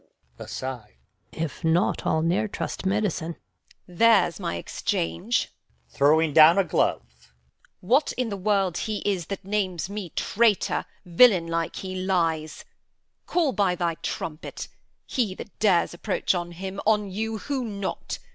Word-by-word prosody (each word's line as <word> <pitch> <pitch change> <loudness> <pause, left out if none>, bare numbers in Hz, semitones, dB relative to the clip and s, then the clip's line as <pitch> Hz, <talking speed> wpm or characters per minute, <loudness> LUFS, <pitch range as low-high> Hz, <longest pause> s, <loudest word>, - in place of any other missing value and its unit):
Gon. - - -9
[aside] 130 -5 -6 0.4
If 160 +1 -5
not, 165 +3 +1
I'll 160 - +2
ne'er 175 +6 +1
trust 195 - -4
medicine. 190 -5 -1 0.5
Edm. 175 -2 -14
There's 220 -7 +5
my 85 - -3
exchange 85 0 -2 0.4
[throws 150 - +3
down 160 +4 +8
a 195 - +5
glove]. - - -2 0.5
What 260 +11 +2
in 250 -2 -2
the 200 - -3
world 195 -3 0
he 215 - -3
is 190 -5 -1
That 195 -2 -6
names 190 -3 -2
me 205 -4 -5
traitor, 220 -2 +1 0.2
villain 180 0 +5
like 165 0 -2
he 185 -1 -5
lies. 170 -5 -1 0.6
Call 330 -6 +2
by 200 -6 +1
thy 170 -1 0
trumpet. 155 -1 -5 0.4
He 225 -8 -1
that 210 - -11
dares 185 -6 +3
approach, 190 +3 -1
On 175 -1 -3
him, 190 +3 -6
on 210 -2 +2
you, 220 +3 -3
who 270 +3 -3
not? 200 -4 -4
185 Hz, 145 wpm, -25 LUFS, 165-210 Hz, 0.6 s, down